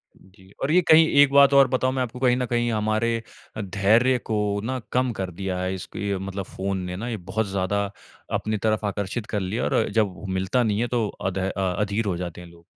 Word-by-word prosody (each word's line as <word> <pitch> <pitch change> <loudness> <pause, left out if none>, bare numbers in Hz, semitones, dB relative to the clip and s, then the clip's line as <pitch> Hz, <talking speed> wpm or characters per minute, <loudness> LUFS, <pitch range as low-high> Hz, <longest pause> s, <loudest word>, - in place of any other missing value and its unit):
जी। 95 0 -21
और 140 - +1
ये 180 +2 +5
कहीं 160 -1 +6
एक 140 -1 +5
बात 140 0 +7
और 135 -1 +7
बताऊँ 130 +1 0
मैं 130 -1 0
आपको, 125 +1 -7
कहीं 125 -2 +3
न 125 - 0
कहीं 120 0 0
हमारे 110 +2 0 0.4
अ, - - -2
धैर्य 105 +7 +3
को 105 -2 0
ना 130 +3 -2
कम 125 -1 +1
कर 95 -1 -3
दिया 95 +1 -4
है। 90 +1 -1
इसके 100 +2 -4
मतलब 95 0 -5
फ़ोन 95 0 -3
ने 90 0 -5
ना, 110 +6 -5
ये 110 - -3
बहुत 95 +4 -2
ज़्यादा 95 +1 -1 0.5
अपनी 110 0 -1
तरफ़ 110 +1 0
आकर्षित 100 +2 -3
कर - - +1
लिया 100 +6 -2
है - - 0
और 110 - +1
जब 105 -5 +1
मिलता 95 +6 +1
नहीं 105 -2 0
है, 120 - 0
तो 120 -4 0
अध 95 0 -4
अ 95 +1 -1 0.3
अधीर 105 +1 0
हो 90 -4 -1
जाते 90 0 -6
हैं 90 - -11
लोग। 85 0 -18
105 Hz, 230 wpm, -24 LUFS, 95-120 Hz, 0.5 s, बात